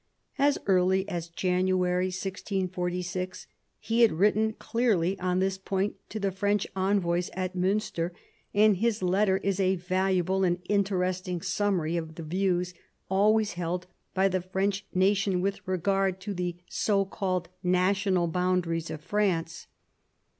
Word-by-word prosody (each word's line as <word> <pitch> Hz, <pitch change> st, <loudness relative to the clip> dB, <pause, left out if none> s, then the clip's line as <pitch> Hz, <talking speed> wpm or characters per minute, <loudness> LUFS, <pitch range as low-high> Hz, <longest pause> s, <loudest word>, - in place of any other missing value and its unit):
As 285 Hz, +1 st, +4 dB
early 190 Hz, 0 st, +3 dB
as 170 Hz, -1 st, -4 dB
January 180 Hz, +1 st, +1 dB
1646 185 Hz, -1 st, -3 dB, 0.3 s
he 230 Hz, +1 st, 0 dB
had 230 Hz, -, +7 dB
written 210 Hz, +5 st, +2 dB
clearly 205 Hz, -7 st, 0 dB
on 180 Hz, 0 st, 0 dB
this 190 Hz, 0 st, 0 dB
point 195 Hz, +1 st, -1 dB, 0.2 s
to 215 Hz, -, -4 dB
the 195 Hz, -1 st, 0 dB
French 200 Hz, +1 st, 0 dB
envoys 185 Hz, -2 st, +1 dB
at 185 Hz, 0 st, -3 dB
Miinster, 185 Hz, -2 st, 0 dB, 0.4 s
and 210 Hz, -1 st, +4 dB
his 220 Hz, -1 st, 0 dB
letter 190 Hz, +1 st, +3 dB
is 195 Hz, 0 st, -1 dB
a 190 Hz, 0 st, +2 dB
valu 185 Hz, +2 st, 0 dB
able 190 Hz, +2 st, +1 dB
and 175 Hz, -1 st, +2 dB
interesting 185 Hz, -3 st, 0 dB
summary 180 Hz, -5 st, 0 dB
of 160 Hz, -1 st, -5 dB
the 165 Hz, -, -7 dB
views 180 Hz, +1 st, 0 dB, 0.4 s
always 210 Hz, +2 st, +3 dB
held 175 Hz, +1 st, -3 dB, 0.3 s
by 190 Hz, +1 st, +4 dB
the 185 Hz, -1 st, 0 dB
French 190 Hz, +2 st, -1 dB
nation 195 Hz, 0 st, +2 dB
with 195 Hz, +2 st, -1 dB
regard 190 Hz, +1 st, +1 dB
to 205 Hz, +1 st, -4 dB
the 180 Hz, -2 st, -2 dB
so 200 Hz, -2 st, +1 dB
called 185 Hz, -3 st, -2 dB
national 185 Hz, 0 st, +2 dB
boundaries 175 Hz, -1 st, 0 dB
of 155 Hz, -, -6 dB
France. 175 Hz, -4 st, -1 dB
185 Hz, 140 wpm, -28 LUFS, 180-195 Hz, 0.4 s, had